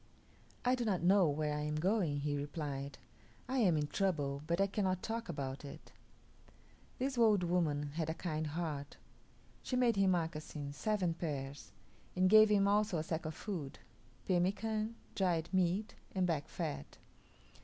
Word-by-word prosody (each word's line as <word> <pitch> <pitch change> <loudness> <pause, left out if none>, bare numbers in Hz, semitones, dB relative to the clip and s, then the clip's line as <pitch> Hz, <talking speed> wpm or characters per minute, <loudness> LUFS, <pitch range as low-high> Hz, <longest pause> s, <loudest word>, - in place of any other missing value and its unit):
"I 250 - +4
do 250 -2 0
not 195 -6 0
know 185 -2 +5
where 150 +1 0
I - - -2
am 150 0 -2
going," 170 -3 +1
he 145 0 -1
replied; 145 -1 -4 0.5
"I 260 +1 0
am 180 -9 +4
in 150 - +1
trouble, 145 -6 -1
but 170 +2 +1
I 195 - +5
cannot 190 -2 -1
talk 230 -2 -3
about 135 -3 -4
it." 140 - -10 1.1
This 260 -1 -1
old 215 -5 +5
woman 155 -5 0
had 160 0 -2
a 160 - -2
kind 155 -2 -2
heart. 150 -3 -4 0.6
She 255 - -3
made 240 -4 +3
him 195 -1 +4
moccasins 155 -4 -2
seven 195 -2 0
pairs; 140 - -5 0.4
and 185 +1 +3
gave 215 0 +9
him 200 -1 +4
also 205 -2 +2
a 155 - -1
sack 160 0 -3
of 155 - -5
food 170 -10 -5 0.5
pemican, 215 +5 0 0.2
dried 175 -4 +1
meat, 185 +3 +1 0.2
and 185 -1 +2
back 160 -5 -1
fat. 70 0 -5
175 Hz, 160 wpm, -35 LUFS, 150-200 Hz, 1.1 s, gave